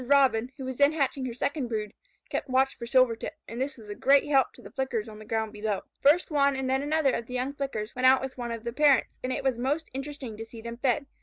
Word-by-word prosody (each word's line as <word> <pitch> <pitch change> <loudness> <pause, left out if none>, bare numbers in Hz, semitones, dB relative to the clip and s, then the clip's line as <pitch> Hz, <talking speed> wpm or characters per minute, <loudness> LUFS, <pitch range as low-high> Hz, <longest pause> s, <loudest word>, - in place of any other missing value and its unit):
Robin, 260 -4 +4
who 265 - -6
was 260 -1 -5
then 285 +2 +5
hatching 275 -3 0
her 240 - -4
second 280 +1 -1
brood, 215 -3 -3 0.3
kept - - -3
watch 265 +1 +2
for 235 - -7
Silvertip, 245 -2 +2
and 235 +2 -5
this 270 0 -2
was 220 -3 -13
a 205 - -5
great 275 +6 +4
help 270 -3 +3
to - - -19
the - - -12
Flickers 255 -5 -2
on 215 -1 -10
the 215 - -11
ground 220 -1 -2
below. 210 -2 -2 0.2
First 305 +5 +4
one 280 -2 +3
and 265 0 -2
then 265 +1 +1
another 295 -1 +2
of 230 - -3
the 250 - -6
young 255 +3 -1
Flickers 265 -7 -4
went 255 0 +4
out 260 0 +7
with 265 0 -5
one 240 -2 -4
of 230 -1 -5
the 235 -1 -4
parents, 285 -2 +3
and 255 - -1
it - - -2
was 260 -3 0
most 290 +6 -1
interesting 270 -4 -6
to 225 - -5
see 225 0 -11
them 235 +1 -7
fed. 265 +2 +1
260 Hz, 265 wpm, -28 LUFS, 230-275 Hz, 0.3 s, out